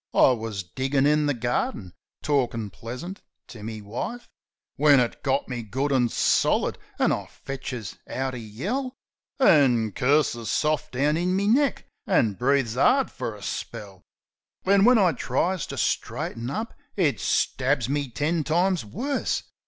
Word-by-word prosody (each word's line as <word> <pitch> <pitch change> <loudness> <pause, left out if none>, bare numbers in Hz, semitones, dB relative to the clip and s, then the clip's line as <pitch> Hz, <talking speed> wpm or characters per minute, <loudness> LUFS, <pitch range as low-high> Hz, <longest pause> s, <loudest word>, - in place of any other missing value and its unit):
I - - +6
wus 110 -5 -3
diggin' 135 +10 0
in 150 0 +3
the 145 - +1
garden, 115 -6 -2 0.3
talkin' 120 -8 0
pleasant 130 - -7 0.3
to 110 - -10
me 110 0 -6
wife, 125 - -5 0.5
When 145 -1 +6
it 120 -2 -1
got 135 0 0
me 125 -2 -4
good 135 +6 -2
an' 125 -3 +3
solid, - - +2 0.2
an' - - +3
I - - -2
fetches 130 -7 -7
out 130 0 -3
a 125 - -5
yell, 205 - -4 0.4
An' 130 - +4
curses 125 -1 +1
soft 150 -3 0
down 145 +5 +2
in 180 +2 0
me 200 +1 +1
neck, 270 +5 +2 0.2
an' 115 - +3
breathes 125 +1 +1
'ard 260 - +3
fer 110 - -5
a 100 - -12
spell. 95 -1 -6 0.6
Then, 195 +1 +4
when 250 0 +7
I 190 -5 +4
tries 180 +1 -1
to - - -7
straighten 115 +1 -2
up, 220 +9 -4 0.2
it 165 -8 +1
stabs 130 -1 +1
me 140 0 -1
ten 150 +6 0
times 175 +2 +1
worse. 260 - -2
135 Hz, 155 wpm, -25 LUFS, 115-170 Hz, 0.6 s, when